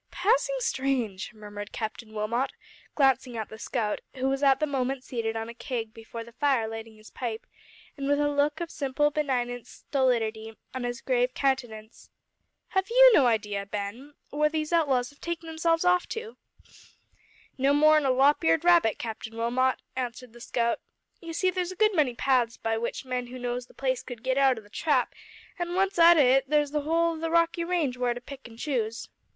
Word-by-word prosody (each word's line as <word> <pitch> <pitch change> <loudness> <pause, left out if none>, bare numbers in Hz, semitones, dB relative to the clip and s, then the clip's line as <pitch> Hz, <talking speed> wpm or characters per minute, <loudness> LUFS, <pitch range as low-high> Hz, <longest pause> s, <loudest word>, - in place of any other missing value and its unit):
"Passing - - +1
strange!" 260 - -1
murmured 205 -2 -9
Captain 220 0 -5
Wilmot, 220 +5 -1 0.4
glancing 265 -4 +2
at 220 - -4
the 220 - -10
scout, 225 -3 -2
who 260 0 -1
was 270 +1 -1
at 270 -2 +4
the 305 - +2
moment 270 -2 -2
seated 225 -3 -3
on 225 0 -3
a 235 - -8
keg 230 -3 -5
before 230 0 -8
the 235 - -14
fire 260 -2 +1
lighting 225 0 -7
his 215 0 -16
pipe, 230 -3 -5 0.5
and 275 -1 -4
with 285 0 +2
a 295 - +2
look 290 +1 +1
of 340 -1 -4
simple 290 +1 0
benignant 245 -5 -2
stolidity 225 -5 -1 0.2
on 260 -1 -3
his 240 0 -4
grave 250 -1 +1
countenance. 240 -5 -2 0.6
"Have 380 +1 0
you - - +8
no 275 - +6
idea, 210 -3 0
Ben, 210 +9 -6 0.2
where 300 +1 +2
these 310 +1 -2
outlaws 270 -7 +2
have 285 - -24
taken 340 -1 -4
themselves 330 +1 0
off 360 0 +3
to?" 455 0 -6 1.2
"No 270 +2 +3
more'n 305 +1 +5
a 270 - +2
lop 275 +6 +4
eared 325 0 +3
rabbit, 340 -11 +5
Captain 225 0 -6
Wilmot," 250 +3 +1 0.2
answered 250 -2 -5
the 240 - -14
scout. 235 0 0 0.4
"You 335 -1 -8
see 370 +3 +1
there's 365 0 -2
a - - -8
good 430 +2 +3
many 290 -8 +2
paths 245 -3 +1
by 225 0 -1
which 235 +3 -3
men 250 -1 -3
who 255 +1 -8
knows 245 0 -4
the - - -21
place 260 -2 -1
could 240 -3 -9
git 260 +1 +1
out 265 -3 +4
o' - - -7
the 205 - -20
Trap, 275 -5 +1 0.5
an' 350 0 -2
once 385 -1 +1
out 335 0 +8
o' 290 - +6
it 265 +1 +3
there's 295 -1 +2
the 300 0 0
whole 335 +3 +1
o' 320 - -7
the 330 0 -2
Rockie 335 0 +2
range 335 -8 0
where 245 -1 0
to - - -5
pick 270 0 -10
an' 225 - -14
choose." 230 -5 -2
260 Hz, 200 wpm, -27 LUFS, 235-305 Hz, 1.2 s, you